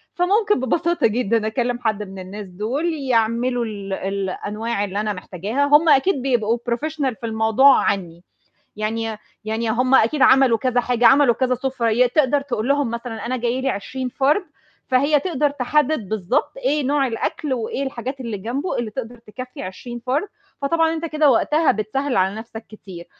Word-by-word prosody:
فممكن 410 Hz, -, +2 dB
ببساطة 335 Hz, +5 st, +1 dB
جدًا 225 Hz, -1 st, 0 dB
أكلّم 245 Hz, +2 st, -1 dB
حد 215 Hz, -3 st, -1 dB
من 195 Hz, -1 st, -9 dB
الناس 195 Hz, +2 st, -8 dB
دُول 235 Hz, -, -2 dB
يعملوا 245 Hz, -3 st, 0 dB
ال 200 Hz, -3 st, -6 dB
الأنواع 200 Hz, +3 st, -3 dB
اللي 200 Hz, 0 st, -3 dB
أنا 210 Hz, -1 st, -1 dB
محتاجاها، 200 Hz, +9 st, -2 dB
هُم 295 Hz, +3 st, +5 dB
أكيد 280 Hz, +1 st, +3 dB
بيبقوا 240 Hz, -4 st, +1 dB
professional 285 Hz, 0 st, -1 dB
في 240 Hz, -, -6 dB
الموضوع 225 Hz, +5 st, +4 dB
عني، 175 Hz, -3 st, -2 dB, 0.5 s
يعني 220 Hz, +2 st, -2 dB
ي 215 Hz, -, -7 dB, 0.3 s
يعني 220 Hz, +1 st, -2 dB
هُم 255 Hz, +3 st, +2 dB
أكيد 265 Hz, +3 st, +3 dB
عملوا 260 Hz, -3 st, +5 dB
كذا 250 Hz, 0 st, +1 dB
حاجة، 245 Hz, -1 st, +2 dB
عملوا 270 Hz, -1 st, +6 dB
كذا 255 Hz, +1 st, +1 dB
سُفرة 255 Hz, -2 st, -1 dB
ي 245 Hz, +3 st, +3 dB
تقدر 285 Hz, +1 st, +2 dB
تقول 255 Hz, -4 st, -3 dB
لهم 280 Hz, -3 st, +1 dB
مثلًا 235 Hz, -1 st, -5 dB
أنا 255 Hz, +2 st, -1 dB
جاي 245 Hz, +1 st, -1 dB
لي 265 Hz, -, -1 dB
20 255 Hz, +5 st, -4 dB
فرد، 280 Hz, +9 st, +1 dB, 0.4 s
فهي 280 Hz, +3 st, +3 dB
تقدر 300 Hz, -5 st, 0 dB
تحدد 285 Hz, -3 st, 0 dB
بالضبط 215 Hz, +2 st, -1 dB
إيه 300 Hz, -, 0 dB
نوع 280 Hz, 0 st, +2 dB
الأكل، 260 Hz, +4 st, -3 dB
وإيه 240 Hz, +3 st, -3 dB
الحاجات 265 Hz, 0 st, -5 dB
اللي 230 Hz, -4 st, -4 dB
جنبه 255 Hz, -, -3 dB
اللي 235 Hz, -3 st, -3 dB
تقدر 240 Hz, +1 st, -7 dB
تكفّي 255 Hz, +5 st, -9 dB
20 240 Hz, +5 st, -7 dB
فرد، 290 Hz, +10 st, 0 dB, 0.3 s
فطبعًا 325 Hz, +3 st, +2 dB
أنت 325 Hz, 0 st, -4 dB
كده 305 Hz, -2 st, +3 dB
وقتها 300 Hz, +6 st, +3 dB
بتسهّل 250 Hz, +6 st, -2 dB
على 190 Hz, +2 st, +2 dB
نفْسك 220 Hz, 0 st, -9 dB
كتير، 190 Hz, -5 st, -11 dB
245 Hz, 170 wpm, -21 LUFS, 220-280 Hz, 0.5 s, عملوا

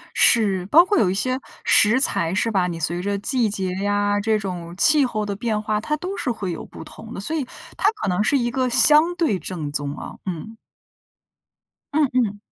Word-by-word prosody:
是， 195 Hz, -6 st, +4 dB
包 325 Hz, -, +5 dB
括 400 Hz, 0 st, 0 dB
有 180 Hz, -, +2 dB
一 185 Hz, -, -2 dB
些 255 Hz, +6 st, -2 dB, 0.2 s
食 225 Hz, +5 st, +5 dB
材， 170 Hz, -9 st, +2 dB
是 230 Hz, +3 st, 0 dB
吧， 190 Hz, -4 st, 0 dB
你 170 Hz, -2 st, -5 dB
随 170 Hz, +2 st, -3 dB
着 200 Hz, +1 st, -2 dB
季 235 Hz, +2 st, 0 dB
节 190 Hz, -2 st, -3 dB
呀， 205 Hz, 0 st, 0 dB
这 215 Hz, +1 st, 0 dB
种 175 Hz, -4 st, -7 dB
气 300 Hz, -, +5 dB
候 215 Hz, -3 st, -4 dB
的 205 Hz, -1 st, -4 dB
变 215 Hz, +1 st, -3 dB
化， 215 Hz, 0 st, -2 dB
它 300 Hz, +8 st, -3 dB
都 370 Hz, +5 st, -6 dB
是 255 Hz, -, -3 dB
会 205 Hz, -6 st, -4 dB
有 165 Hz, -, -8 dB
不 -, -, -12 dB
同 225 Hz, +1 st, -12 dB
的， -, -, -6 dB
所 295 Hz, +11 st, -3 dB
以 305 Hz, -4 st, -2 dB, 0.3 s
它 -, -, +2 dB
可 415 Hz, -, -6 dB
能 180 Hz, +2 st, 0 dB
是 275 Hz, +6 st, +1 dB
一 240 Hz, -2 st, -1 dB
个 255 Hz, +1 st, -1 dB
相 300 Hz, +7 st, +5 dB
对 315 Hz, -, 0 dB
正 160 Hz, -3 st, -6 dB
宗 145 Hz, -1 st, -4 dB
啊， -, -, -9 dB
嗯。 185 Hz, +5 st, -7 dB, 1.4 s
嗯 300 Hz, -2 st, +2 dB
嗯。 220 Hz, -5 st, 0 dB
210 Hz, 225 characters per minute, -21 LUFS, 190-255 Hz, 1.4 s, 包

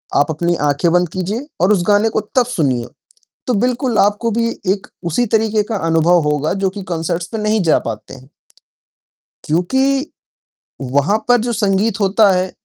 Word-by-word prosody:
आप 145 Hz, -, +3 dB
अपनी 170 Hz, +3 st, 0 dB
आँखें 145 Hz, +4 st, +1 dB
बंद 180 Hz, -1 st, +2 dB
कीजिए 200 Hz, -, -4 dB
और 185 Hz, +4 st, +4 dB
उस 180 Hz, -3 st, +1 dB
गाने 205 Hz, +2 st, +3 dB
को -, -, -1 dB, 0.2 s
तब 250 Hz, -2 st, +4 dB
सुनिए। 135 Hz, -, -1 dB, 0.6 s
तो 250 Hz, -, +1 dB
बिल्कुल 245 Hz, +2 st, 0 dB
आपको 210 Hz, +3 st, +2 dB
भी 230 Hz, +1 st, 0 dB, 0.2 s
एक 195 Hz, 0 st, -5 dB, 0.2 s
उसी 245 Hz, +10 st, +1 dB
तरीके 220 Hz, -1 st, +2 dB
का 220 Hz, -, 0 dB
अनुभव 165 Hz, +2 st, +3 dB
होगा 150 Hz, +2 st, 0 dB
जो 190 Hz, -, +2 dB
कि 200 Hz, +1 st, -8 dB
कॉन्सर्ट्स 170 Hz, +1 st, -3 dB
में 220 Hz, -, -2 dB
नहीं 215 Hz, -1 st, +1 dB
जा 160 Hz, -, +3 dB
पाते 110 Hz, +2 st, -7 dB
हैं। 130 Hz, 0 st, -16 dB, 1.2 s
क्योंकि 265 Hz, -, 0 dB, 0.7 s
वहाँ 140 Hz, +10 st, +1 dB
पर 245 Hz, 0 st, +5 dB
जो 240 Hz, -, -1 dB
संगीत 205 Hz, 0 st, 0 dB
होता 200 Hz, +1 st, +4 dB
है 185 Hz, 0 st, -1 dB
195 Hz, 170 wpm, -17 LUFS, 165-225 Hz, 1.2 s, पर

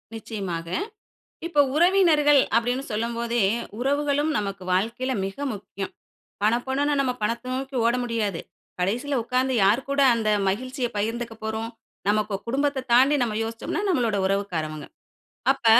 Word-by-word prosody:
நிச்சயமாக. 195 Hz, -7 st, -5 dB, 0.8 s
இப்போ 300 Hz, -4 st, +4 dB
உறவினர்கள் 315 Hz, -5 st, +5 dB
அப்படின்னு 245 Hz, +3 st, +1 dB
சொல்லும் 230 Hz, +2 st, -2 dB
போதே, 235 Hz, -1 st, 0 dB, 0.4 s
உறவுகளும் 285 Hz, +3 st, +1 dB
நமக்கு 195 Hz, -2 st, -3 dB
வாழ்க்கையில 235 Hz, +7 st, 0 dB
மிக 195 Hz, -, -6 dB, 0.2 s
முக்கியம். 195 Hz, -1 st, -6 dB, 0.5 s
பணப்பணன்னு 265 Hz, +6 st, +1 dB
நம்ம 255 Hz, -2 st, 0 dB
பணத்த 235 Hz, +3 st, -1 dB
நோக்கி 265 Hz, +1 st, -4 dB
ஓட 235 Hz, -, +4 dB
முடியாது. 220 Hz, -7 st, -1 dB, 0.4 s
கடைசியில 245 Hz, +9 st, 0 dB
உட்கார்ந்து 255 Hz, +2 st, 0 dB
யார் 215 Hz, +7 st, +3 dB
கூட 280 Hz, 0 st, +2 dB
அந்த 225 Hz, -2 st, 0 dB, 0.2 s
மகிழ்ச்சிய 255 Hz, +5 st, -2 dB
பகிர்ந்துக்க 230 Hz, +2 st, -2 dB
போறோம்? 220 Hz, +1 st, -3 dB, 0.4 s
நமக்கு 210 Hz, -1 st, +1 dB
குடும்பத்த 270 Hz, +1 st, 0 dB
தாண்டி 265 Hz, +4 st, +6 dB
நம்ம 220 Hz, -3 st, -2 dB
யோசிச்சோம்னா, 225 Hz, -, -3 dB
நம்மளோட 235 Hz, -, +1 dB
உறவுக்காரவங்க. 170 Hz, -6 st, -2 dB, 0.7 s
அப்ப 270 Hz, -, -5 dB
235 Hz, 125 wpm, -25 LUFS, 210-270 Hz, 0.8 s, தாண்டி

